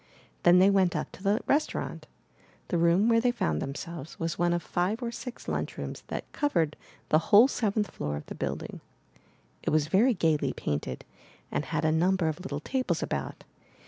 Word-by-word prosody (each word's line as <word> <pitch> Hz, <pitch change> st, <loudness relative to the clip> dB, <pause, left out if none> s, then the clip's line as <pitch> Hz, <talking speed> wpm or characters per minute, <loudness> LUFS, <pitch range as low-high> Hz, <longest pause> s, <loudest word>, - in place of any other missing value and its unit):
Then 175 Hz, +1 st, +6 dB
they 190 Hz, +2 st, +6 dB
went 190 Hz, -3 st, +3 dB
up -, -, -3 dB
to -, -, -13 dB
the 205 Hz, +3 st, +1 dB
restaurant. 295 Hz, +2 st, -1 dB, 0.6 s
The 175 Hz, -, +1 dB
room 170 Hz, +5 st, +4 dB
where 230 Hz, -1 st, +4 dB
they 245 Hz, -, +3 dB
found 80 Hz, -, -1 dB
themselves 150 Hz, +2 st, -6 dB
was 165 Hz, -1 st, -1 dB
one 175 Hz, 0 st, +1 dB
of 175 Hz, -1 st, 0 dB
five 200 Hz, +8 st, -1 dB
or 235 Hz, -, -2 dB
six 245 Hz, +1 st, -8 dB
lunchrooms -, -, -4 dB
that -, -, -4 dB
covered 170 Hz, -, 0 dB, 0.3 s
the 155 Hz, -, +5 dB
whole 225 Hz, +4 st, +8 dB
seventh 215 Hz, -5 st, -1 dB
floor 75 Hz, 0 st, -3 dB
of 75 Hz, -, -7 dB
the -, -, -7 dB
build -, -, -3 dB
ing. -, -, -9 dB, 0.8 s
It -, -, -1 dB
was 155 Hz, -1 st, +2 dB
very 225 Hz, +7 st, +4 dB
gaily 160 Hz, -4 st, +1 dB
painted, 70 Hz, -3 st, -4 dB, 0.5 s
and -, -, -1 dB
had 155 Hz, -1 st, -1 dB
a 155 Hz, -, +3 dB
number 175 Hz, +2 st, +2 dB
of 155 Hz, +2 st, -2 dB
little 150 Hz, -6 st, -5 dB
tables 260 Hz, -, -1 dB
about. -, -, -4 dB
175 Hz, 185 wpm, -28 LUFS, 155-215 Hz, 0.8 s, whole